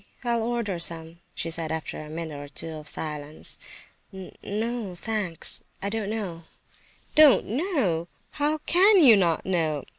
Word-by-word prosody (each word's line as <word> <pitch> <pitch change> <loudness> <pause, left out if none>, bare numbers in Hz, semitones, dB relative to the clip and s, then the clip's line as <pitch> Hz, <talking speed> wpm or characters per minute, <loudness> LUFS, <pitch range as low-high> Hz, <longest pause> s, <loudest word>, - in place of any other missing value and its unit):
I'll 235 -1 0
order 225 -6 -2
some," 165 0 0 0.2
she 165 - -3
said, 165 -1 -2
after 160 -1 -5
a 150 - -10
minute 160 -2 -6
or 145 - -8
two 160 +3 -5
of 155 -2 -8
silence. 150 -1 +1 0.5
"N 190 -2 -10
no 220 -2 -4
thanks, 200 -3 0 0.2
I 200 - -3
don't 215 -1 -3
know—" 185 -7 -5 0.7
"Don't 300 -3 +6
know! 235 - -1 0.2
How 300 +1 0
can 390 +4 +5
you 240 -6 +9
not 175 -5 +1
know? 160 -6 -1
185 Hz, 150 wpm, -25 LUFS, 160-230 Hz, 0.7 s, you